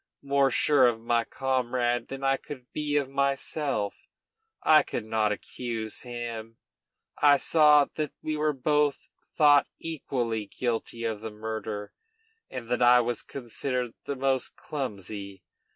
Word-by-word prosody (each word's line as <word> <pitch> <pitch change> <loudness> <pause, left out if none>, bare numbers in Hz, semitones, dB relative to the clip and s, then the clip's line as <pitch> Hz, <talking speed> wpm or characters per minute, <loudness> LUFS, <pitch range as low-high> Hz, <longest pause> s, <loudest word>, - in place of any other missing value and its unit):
More 140 -1 +3
sure 135 0 +5
of 115 -2 0
my 115 0 +1
comrade 120 -2 -1
than 135 0 -7
I 135 0 +3
could 130 -2 -10
be 150 -1 0
of 140 -2 +1
myself, 140 -4 -1 0.6
I 155 -1 +7
could 110 - -4
not 110 -1 +1
accuse 110 +1 -4
him. 115 -2 -6 0.6
I 145 -1 +6
saw 150 -1 +5
that 155 -2 -2
we 155 - -1
were 150 0 +1
both 150 +1 0
thought 145 -2 +4
equally 120 -9 -3
guilty 115 +1 -3
of 110 -2 -2
the 110 - -5
murder, 110 -1 -5 0.6
and 120 -3 -6
that 125 - 0
I 125 0 +7
was 120 0 -1
considered 125 -1 -4
the 140 - -3
most 135 -1 -1
clumsy. 100 -7 -6
125 Hz, 135 wpm, -28 LUFS, 115-140 Hz, 0.6 s, I